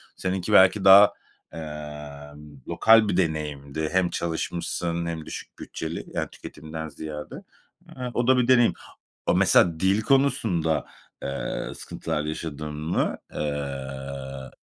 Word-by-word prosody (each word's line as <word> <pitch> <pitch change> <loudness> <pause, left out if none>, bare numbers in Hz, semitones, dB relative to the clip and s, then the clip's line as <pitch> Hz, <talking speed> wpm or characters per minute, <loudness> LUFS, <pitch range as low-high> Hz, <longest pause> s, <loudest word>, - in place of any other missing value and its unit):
Seninki 95 +2 -2
belki 95 +1 +6
daha, 100 +2 +9 0.4
emm, 75 -1 -9
lokal 110 -1 +5
bir 90 - 0
deneyimdi 75 -2 -2
hem 90 -1 +2
çalışmışsın 85 0 -2
hem 80 -2 -4
düşük - - -8
bütçeli, 80 +1 -5
yani, - - -2
tüketimden 80 +1 -8
ziyade. 75 0 -7 0.6
Hıı, 125 -1 -5
o 120 0 0
da 130 0 +5
bir 125 -1 +2
deneyim. 120 -2 +5 0.5
O - - +3
mesela 80 -2 +4
dil 95 +3 +3
konusunda, 105 - +1 0.4
eee, 70 -3 -4
sıkıntılar 75 - -4
yaşadın 75 -1 -5
mı? 75 +3 -1 0.2
Eee, 70 -2 -5
80 Hz, 120 wpm, -25 LUFS, 75-95 Hz, 0.6 s, daha